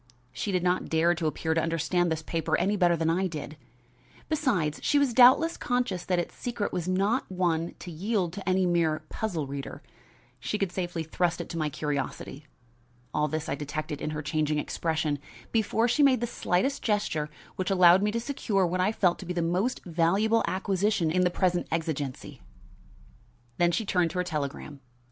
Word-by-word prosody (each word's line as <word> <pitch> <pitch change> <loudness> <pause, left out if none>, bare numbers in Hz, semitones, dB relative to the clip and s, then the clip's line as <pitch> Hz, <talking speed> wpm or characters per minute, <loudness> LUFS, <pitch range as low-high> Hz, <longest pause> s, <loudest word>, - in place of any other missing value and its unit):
She 200 - -3
did 180 -2 0
not 180 0 0
dare 165 +2 +3
to 160 -1 -2
appear 160 +2 -1
to 165 - +1
understand 165 +2 0
this 160 0 -2
paper 165 -1 -1
any 195 +4 +1
better 175 -3 +3
than 165 0 +1
I 185 +3 +1
did. 155 -3 -6 0.7
Besides, 230 - 0
she 290 - +2
was 280 -4 +2
doubtless 260 +7 +6
conscious 245 -8 -1
that 180 - +1
its 175 - -2
secret 240 -4 -3
was 180 -1 -2
not 195 +6 0
one 170 -2 0
to 175 - -9
yield 185 +1 -1
to 195 -1 -4
any 185 0 +3
mere 165 -3 +1
puzzle 175 -9 -3
reader. 140 0 -7 0.6
She 170 - -2
could 195 -3 -1
safely 175 -3 -3
trust 170 +2 0
it - - -6
to 170 - -5
my 155 -1 0
curiosity. 145 0 -4 0.7
All 150 0 +1
this 155 +1 -3
I - - -1
detected 150 +1 -4
in - - -2
her 150 0 -4
changing 150 0 0
expression, 155 -1 -1 0.3
before 225 +1 +2
she 245 +5 +2
made 275 -3 +5
the 240 - -1
slightest 235 +4 0
gesture 180 -8 0 0.3
which 185 +1 -2
allowed 180 -1 +6
me 210 - +2
to 230 +2 -1
secure 225 -6 0
what 180 +1 0
I 190 - +2
felt 180 -5 +1
to 185 - -8
be 180 - -2
the 170 -1 0
most 185 +10 -1
valuable 190 +7 +2
acquisition 190 -2 0
in 180 +2 +2
the 180 - +3
present 180 -1 0
exigency. 155 -5 -3 1.2
Then 175 0 +4
she 220 +6 -1
turned 180 -3 +2
to 180 - -6
her 180 - +1
telegram. 150 -3 -4
175 Hz, 190 wpm, -28 LUFS, 160-200 Hz, 1.2 s, doubtless